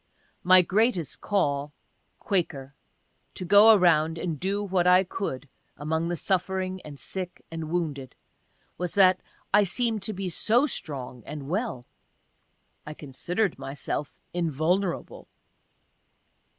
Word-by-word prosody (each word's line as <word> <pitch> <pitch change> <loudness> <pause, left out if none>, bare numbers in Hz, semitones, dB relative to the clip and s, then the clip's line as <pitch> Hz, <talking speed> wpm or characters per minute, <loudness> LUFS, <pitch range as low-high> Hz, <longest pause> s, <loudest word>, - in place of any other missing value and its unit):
My 185 0 +7
greatest 190 - 0
call 145 -7 0 0.4
(Quaker) 140 -8 -2 0.6
to 185 - -4
go 205 +4 +8
around 165 -4 +3
and 165 -3 -3
do 200 +2 0
what 185 -3 +1
I 180 +1 +6
could 145 -7 -5 0.3
among 160 +3 -1
the 175 - -1
suffering 185 +1 -1
and 145 -2 -11
sick 180 -2 -6
and 165 -1 -5
wounded 150 -7 -3 0.6
was 180 -1 -3
that 185 -2 +5 0.3
I 210 0 +6
seem'd 225 +2 -1
to 215 - -4
be 195 0 -4
so 225 - +2
strong 130 - -5
and 145 -2 -7
well. 185 - -3 1.0
(I 150 - -8
considered 170 +8 -2
myself 140 +1 -5 0.2
invulnerable.) 170 +3 -1
175 Hz, 120 wpm, -26 LUFS, 150-195 Hz, 1.0 s, go